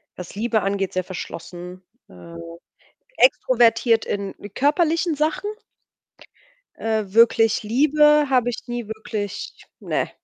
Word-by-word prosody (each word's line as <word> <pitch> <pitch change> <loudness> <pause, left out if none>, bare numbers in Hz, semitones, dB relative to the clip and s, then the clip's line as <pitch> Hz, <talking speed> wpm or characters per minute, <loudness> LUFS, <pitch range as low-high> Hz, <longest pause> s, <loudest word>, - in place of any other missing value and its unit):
was 180 +1 -9
Liebe 225 0 0
angeht, 195 -1 -2
sehr 185 0 -1
verschlossen. 180 0 -8 0.3
Äh, 90 - -13 0.8
extrovertiert 230 - +3
in 200 -1 -3 0.2
körperlichen 320 +3 +1
Sachen, 310 +7 -1 1.3
äh, 220 -1 -1
wirklich 225 +1 +3
Liebe 300 +5 +4
habe 250 -2 +2
ich 245 - -7
nie 240 -2 -5
wirklich 215 -2 -6
ne. - - -2
225 Hz, 105 wpm, -22 LUFS, 200-270 Hz, 1.3 s, Liebe